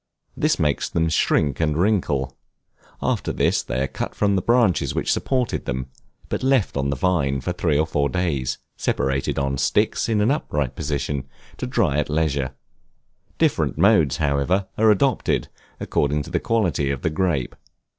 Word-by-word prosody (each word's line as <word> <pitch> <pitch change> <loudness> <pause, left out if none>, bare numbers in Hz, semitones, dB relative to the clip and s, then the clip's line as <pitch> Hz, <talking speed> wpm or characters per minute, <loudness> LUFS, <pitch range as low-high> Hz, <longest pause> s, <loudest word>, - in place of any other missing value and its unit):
This - - +1
makes 75 -2 0
them 80 0 +1
shrink 75 -3 +1
and 75 -2 +1
wrinkle: 75 -9 0 0.7
after - - 0
this - - +1
they 65 +2 -2
are - - 0
cut - - -5
from 100 -1 +2
the 95 - +1
branches 115 -6 +2
which - - 0
supported 130 -3 -1
them, 65 +1 -3 0.4
but - - -3
left 130 -5 +2
on 70 0 0
the 70 - 0
vine 70 -3 +1
for 90 +7 -3
three 80 -4 +1
or 80 - +2
four 75 -3 0
days, 70 -8 -1 0.2
separated 65 0 -1
on 70 -1 -1
sticks, 70 - +1
in 110 -2 +2
an 105 +5 +3
upright 75 - -2
position, 70 -2 -3 0.3
to 130 - -4
dry 105 - +1
at 75 - -1
leisure. 70 -4 0 0.8
Different - - +1
modes, 85 - +4
however, 75 +7 +1
are 110 0 +4
adopted, 125 +4 +1 0.3
according 75 +1 0
to - - -10
the - - +1
quality 90 -11 0
of 70 -2 -3
the 80 - +1
grape. 75 -6 0
75 Hz, 165 wpm, -22 LUFS, 70-95 Hz, 0.8 s, modes